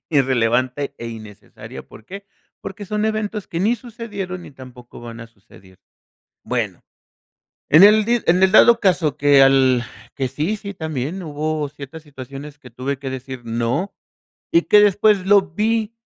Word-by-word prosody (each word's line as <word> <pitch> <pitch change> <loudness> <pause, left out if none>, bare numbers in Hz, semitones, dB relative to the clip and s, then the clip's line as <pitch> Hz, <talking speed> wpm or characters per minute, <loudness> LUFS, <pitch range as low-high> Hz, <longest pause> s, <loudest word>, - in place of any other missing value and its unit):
irrelevante 130 0 0
e 115 - -7
innecesaria, 110 -3 -11
¿por 110 - -15
qué?, 195 +7 -10 0.3
porque 205 +2 -8
son 210 +2 -2
eventos 215 -1 -3
que 170 - -4
ni 225 +5 +1
sucedieron 205 -6 -7
ni - - -12
tampoco 125 -3 -14
van 115 -1 -9
a 115 - -9
suceder, 95 -3 -21 0.7
bueno. - - -3 0.9
En 155 +5 +7
el 210 +1 +5
di 240 0 +1
en 180 +3 +3
el 190 - +5
dado 235 +1 +6
caso 165 -7 +1
que 145 -1 +5
al 130 -2 +4 0.3
que 135 -2 -2
sí 155 +11 -2
sí, 200 -1 -8
también 160 +1 -5
hubo 155 -1 -3
ciertas 150 +2 -11
situaciones 140 0 -10
que 125 - -15
tuve 130 +3 -4
que 135 -1 -6
decir: 130 -1 -7
"No", 120 - -2 0.6
y 335 - +4
que 210 - +4
después 205 -1 +3
lo 200 -1 +5
vi 220 +4 -2
150 Hz, 160 wpm, -20 LUFS, 130-200 Hz, 0.9 s, En